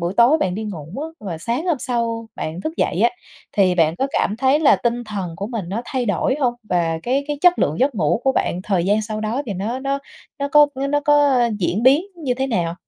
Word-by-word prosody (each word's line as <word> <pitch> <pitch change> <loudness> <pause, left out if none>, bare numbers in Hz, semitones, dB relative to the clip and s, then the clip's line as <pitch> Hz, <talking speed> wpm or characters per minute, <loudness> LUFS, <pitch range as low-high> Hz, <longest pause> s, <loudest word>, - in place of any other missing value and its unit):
buổi 170 +2 -2
tối 245 +7 +5
bạn 185 - 0
đi 220 +3 -4
ngủ 170 -9 -6 0.2
á, 320 -8 -9
rồi 170 -4 -4
sáng 240 - -2
hôm 335 -6 +1
sau 230 -3 -2
bạn 160 +3 -5
thức 315 - -3
dậy - - 0
á, - - +4 0.4
thì 190 -3 +3
bạn 165 -1 +2
có 270 - 0
cảm 210 - 0
thấy 265 +4 +3
là 295 - +5
tinh 240 0 -1
thần 195 -6 -5
của 200 - -4
mình 220 -6 -5
nó 210 +6 -3
thay 250 -1 -2
đổi 200 +5 +1
hông? 245 -3 +1
Và 170 -5 0
cái 270 +3 0
cái 295 -1 -2
chất 360 +1 +5
lượng 155 +3 0
giấc 270 +1 +2
ngủ 180 +1 +1
của 265 - +3
bạn 180 -7 -1
thời 185 -4 0
gian 205 +3 +2
sau 215 0 -4
đó 220 +6 -2
thì 210 - -3
nó 215 +7 -3
nó 275 +1 -1 0.4
nó 280 0 -2
có 295 +1 +6
với 270 +1 -2
nó 290 +1 +1
có, 290 0 +4
ơ, 245 -3 +3
diễn 195 +3 -1
biến 270 +6 +5
như 280 -7 -2
thế 265 +2 -1
nào? 175 -9 -1
235 Hz, 255 wpm, -20 LUFS, 190-275 Hz, 0.4 s, có